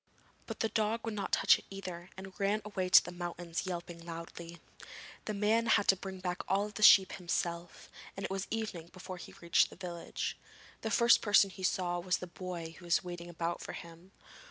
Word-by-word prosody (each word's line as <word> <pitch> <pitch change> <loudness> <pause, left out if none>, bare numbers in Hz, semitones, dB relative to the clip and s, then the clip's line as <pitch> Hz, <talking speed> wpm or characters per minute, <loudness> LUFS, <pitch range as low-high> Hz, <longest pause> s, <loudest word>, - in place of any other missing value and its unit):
But - - -6
the 225 - +1
dog 220 +1 0
would 225 - -2
not 205 -2 -4
touch - - +5
it - - -17
either, 185 -2 -7
and 190 0 -9
ran 205 +2 +1
away 190 -3 -2
to - - +8
the 175 - -6
mountains, 175 0 -4
yelping 170 -1 -5
loudly. 170 0 -8 0.7
The 215 - -3
man 220 +3 +2
had 220 -2 +4
to 195 - +7
bring 190 0 -7
back 180 -1 -3
all 200 +2 +1
the 210 - -8
sheep 195 -2 +8
himself, 170 -1 -3 0.3
and 195 - -3
it - - -5
was 195 0 -3
evening 215 -7 -4
before 185 0 -8
he - - -10
reached 170 0 +3
the - - -12
village. 175 -1 -5 0.4
The 220 - -2
first 235 +3 +5
person 205 -2 +5
he 190 - -11
saw 180 -1 0
was 180 +1 0
the - - -6
boy 175 -2 -6
who 175 - -13
was 170 - +2
waiting 175 -1 -7
about 170 0 -3
for - - -6
him. 170 +2 -11
185 Hz, 205 wpm, -32 LUFS, 175-200 Hz, 0.7 s, to